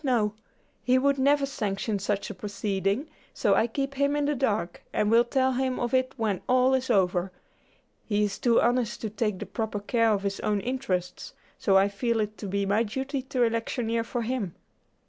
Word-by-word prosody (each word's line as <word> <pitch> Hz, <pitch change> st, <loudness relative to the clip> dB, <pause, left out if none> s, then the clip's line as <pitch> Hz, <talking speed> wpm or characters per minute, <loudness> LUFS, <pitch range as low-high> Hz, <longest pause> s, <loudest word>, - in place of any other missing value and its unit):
no; 230 Hz, -6 st, +1 dB, 0.5 s
he 255 Hz, 0 st, +3 dB
would 280 Hz, +1 st, +2 dB
never 280 Hz, +1 st, +3 dB
sanction 210 Hz, -5 st, -2 dB
such 205 Hz, +1 st, -2 dB
a -, -, -6 dB
proceeding, 200 Hz, -, -2 dB, 0.3 s
so -, -, +2 dB
I 230 Hz, -, +3 dB
keep 275 Hz, +4 st, -3 dB
him 280 Hz, +1 st, +1 dB
in 290 Hz, -1 st, +1 dB
the 295 Hz, -, +1 dB
dark, 220 Hz, -9 st, -1 dB
and 210 Hz, 0 st, +1 dB
will 230 Hz, +1 st, +6 dB
tell 260 Hz, +1 st, +1 dB
him 260 Hz, 0 st, -1 dB
of 240 Hz, 0 st, -2 dB
it 255 Hz, 0 st, +2 dB
when 215 Hz, -5 st, -1 dB
all 255 Hz, +1 st, +4 dB
is 260 Hz, 0 st, 0 dB
over. 185 Hz, -1 st, +2 dB, 0.8 s
He 210 Hz, 0 st, +1 dB
is 200 Hz, -1 st, -2 dB
too 235 Hz, -2 st, +4 dB
honest 240 Hz, -1 st, +1 dB
to 220 Hz, -, -3 dB
take 210 Hz, -2 st, -1 dB
the 210 Hz, -, -6 dB
proper 210 Hz, +1 st, -3 dB
care 230 Hz, +2 st, +2 dB
of 200 Hz, -2 st, 0 dB
his 200 Hz, 0 st, -2 dB
own 210 Hz, -1 st, 0 dB
interests, 240 Hz, -8 st, -3 dB, 0.3 s
so 195 Hz, -1 st, +4 dB
I 195 Hz, +1 st, +5 dB
feel 230 Hz, +3 st, -1 dB
it 215 Hz, 0 st, -2 dB
to 205 Hz, -, -5 dB
be 200 Hz, +1 st, -1 dB
my 205 Hz, +3 st, +2 dB
duty 265 Hz, +5 st, -2 dB
to 255 Hz, -1 st, 0 dB
electioneer 230 Hz, 0 st, 0 dB
for 235 Hz, +1 st, -3 dB
him." 225 Hz, -7 st, -3 dB
230 Hz, 200 wpm, -27 LUFS, 205-260 Hz, 0.8 s, will